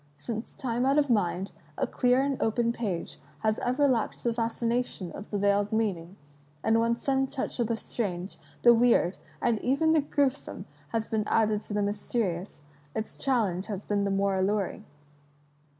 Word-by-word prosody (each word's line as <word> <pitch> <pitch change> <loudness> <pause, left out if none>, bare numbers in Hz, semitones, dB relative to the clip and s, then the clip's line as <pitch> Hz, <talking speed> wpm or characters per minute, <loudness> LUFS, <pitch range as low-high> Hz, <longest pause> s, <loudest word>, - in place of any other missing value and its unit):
Since 220 +10 -6
tinie 245 0 -1
out 275 +2 +3
of 285 -3 +3
mind, 195 -2 +1 0.3
a - - +1
dear 250 +1 +2
and 275 -1 -1
open 235 +1 +1
page 200 -8 -3 0.2
has 215 -1 +1
ever 265 +4 +2
lacked 240 -5 0
the 235 - +1
fascination 230 -4 -1
of 205 - -9
the 205 - -1
veiled 200 +1 +2
meaning, 195 -5 -1 0.5
and 225 +1 +3
when 230 +1 +2
some 270 +2 0
touch 265 -1 -4
of 235 - +2
the 230 - 0
strange, 195 -5 -4 0.2
the 240 - +9
weird, 230 -6 +3 0.2
and 225 -3 +2
even 280 +5 +2
the 320 -1 +4
gruesome, 280 -1 -1 0.2
has 225 -1 -2
been 215 -1 -1
added 215 -2 +2
to 210 - -6
the 205 - +2
mysterious, 200 -5 -2 0.3
its 220 - -4
challenge 210 -9 +1
has 205 -2 -4
been 205 -1 0
the 200 - 0
more 195 0 +1
alluring. 195 +1 0
225 Hz, 170 wpm, -28 LUFS, 200-245 Hz, 0.5 s, the